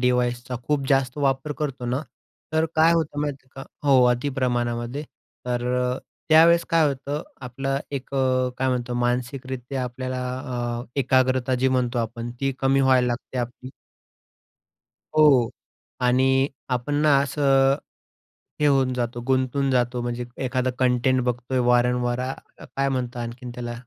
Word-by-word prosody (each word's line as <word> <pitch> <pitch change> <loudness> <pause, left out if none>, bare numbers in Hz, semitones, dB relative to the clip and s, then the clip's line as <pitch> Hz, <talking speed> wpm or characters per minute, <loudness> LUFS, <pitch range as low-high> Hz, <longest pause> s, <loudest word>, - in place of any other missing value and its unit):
डिव्हायसचा 125 0 0
खूप 145 -2 0
जास्त 135 -1 +1
वापर 135 +1 0
करतो 135 -4 -3
ना, 125 +4 -1 0.5
तर 160 0 +2
काय 160 +1 +5
होतं 155 -3 0
माहिती 145 -3 -4
आहे 135 - -6
का? - - -9 0.2
हो. 130 -2 +6
अति 125 +4 -3
प्रमाणामध्ये. 120 +1 -1 0.4
तर 120 0 -1 0.2
अ, 125 +1 -1 0.3
त्यावेळेस 165 +2 +6
काय 165 -2 +4
होतं? 140 +2 -4 0.2
आपलं 135 +2 -3
एक 140 -1 -5
अ, 130 -1 +2
काय 130 0 +1
म्हणतो 125 -1 -1
मानसिकरित्या 125 +1 -3
आपल्याला 130 +1 -4 0.6
अ, - - -10 0.2
एकाग्रता 130 0 +2
जी 130 +1 +2
म्हणतो 125 -1 0
आपण 115 +1 -3
ती 135 0 0
कमी 135 +1 +3
व्हायला 130 -2 +4
लागते 125 +1 -4
आपली. 125 +1 -5 1.4
हो, 155 - +5
हो, 125 -5 +4 0.5
आणि 130 +2 +3 0.2
आपण 125 +3 -1
ना 150 -2 +5
असं, 135 -1 +3 0.9
हे 150 - +4
होऊन 135 -2 +3
जातो. 120 -1 -3
गुंतून 130 +1 +1
जातो. 125 -1 +1
म्हणजे 120 0 -3 0.2
एखादं 130 0 0
कंटेंट 130 0 +2
बघतोय 125 +1 -1
वारंवार 125 0 +2
अ, 130 +1 -2 0.3
काय 135 0 -1
म्हणतात 125 -2 -3
आणखीन 120 +1 -7
त्याला? 120 -1 -5
130 Hz, 145 wpm, -24 LUFS, 125-135 Hz, 1.4 s, हो